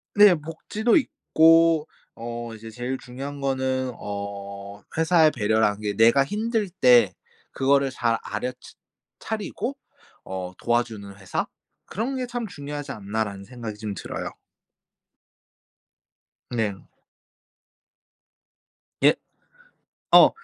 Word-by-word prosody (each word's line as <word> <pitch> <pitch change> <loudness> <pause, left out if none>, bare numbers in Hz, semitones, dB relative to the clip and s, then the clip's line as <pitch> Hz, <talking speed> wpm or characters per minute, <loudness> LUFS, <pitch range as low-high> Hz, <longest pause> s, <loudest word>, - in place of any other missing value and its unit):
네. 205 -3 +8
복지도 185 +9 -1
있고 165 - +4 0.3
어 120 0 -6
이제 110 +1 -10
제일 125 +4 -4
중요한 135 +4 -7
거는 130 -1 0
어 100 0 -6 0.2
회사의 160 -1 +5
배려라는 110 -3 +2
게 105 -1 -1
'내가 115 +5 +5
힘들 215 - -1
때 125 - +5 0.4
그거를 140 0 +2
잘 120 -2 +1
알아 115 +4 -3
ㅊ 125 - -16 0.4
차리고 225 +5 -4 0.5
어 95 -1 -5
도와주는 115 -4 -1
회사 95 -2 -2 0.4
그런 235 +7 -3
게 255 - -1
참 240 -2 -4
중요하지 145 -3 -6
않나.'라는 100 -3 -3
생각이 115 -3 -7
좀 105 -1 -4
들어요. 95 - -5 2.2
네. 110 -4 -1 2.3
예. - - +7 1.0
어 - - +9
125 Hz, 205 characters per minute, -25 LUFS, 105-160 Hz, 2.3 s, 어